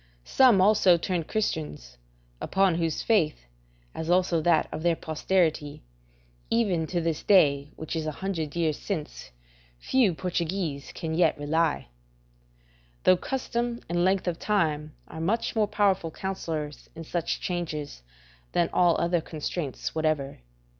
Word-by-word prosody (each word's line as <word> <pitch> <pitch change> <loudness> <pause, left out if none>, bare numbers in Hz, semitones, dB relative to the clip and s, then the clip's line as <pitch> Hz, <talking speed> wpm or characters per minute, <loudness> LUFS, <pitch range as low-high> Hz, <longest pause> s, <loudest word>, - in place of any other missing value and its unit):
Some 245 -8 +5
also 195 -3 +5
turned 170 -1 -2
Christians, 155 - -3 0.4
upon 195 -2 +2
whose 165 -2 -1
faith, 165 - +1 0.5
as 160 +1 -5
also 175 -2 +3
that 165 0 +3
of - - -5
their 170 0 +2
posterity, 155 - -1 0.7
even 195 -9 +1
to 175 - -1
this 165 -2 -1
day, 145 -7 +4
which 160 +1 -5
is 160 -1 -2
a - - -1
hundred 170 -6 -3
years 160 -3 0
since, - - -5 0.5
few 215 - +2
Portuguese 170 -4 -3
can 160 -2 -5
yet 170 +2 +3
rely; 150 - 0 1.1
though 185 - +6
custom 240 +1 -3
and 175 0 0
length 190 0 +1
of 170 -1 -1
time 155 -7 0
are 160 - -8
much 220 +9 0
more 215 -2 +2
powerful 200 -5 +1
counsellors 160 -5 -5
in 165 - -7
such 170 +1 -2
changes 155 - -4 0.5
than 170 - +1
all 175 -2 +4
other 170 0 +1
constraints 155 -2 -4
whatever. 155 -3 -1
170 Hz, 135 wpm, -27 LUFS, 155-190 Hz, 1.1 s, though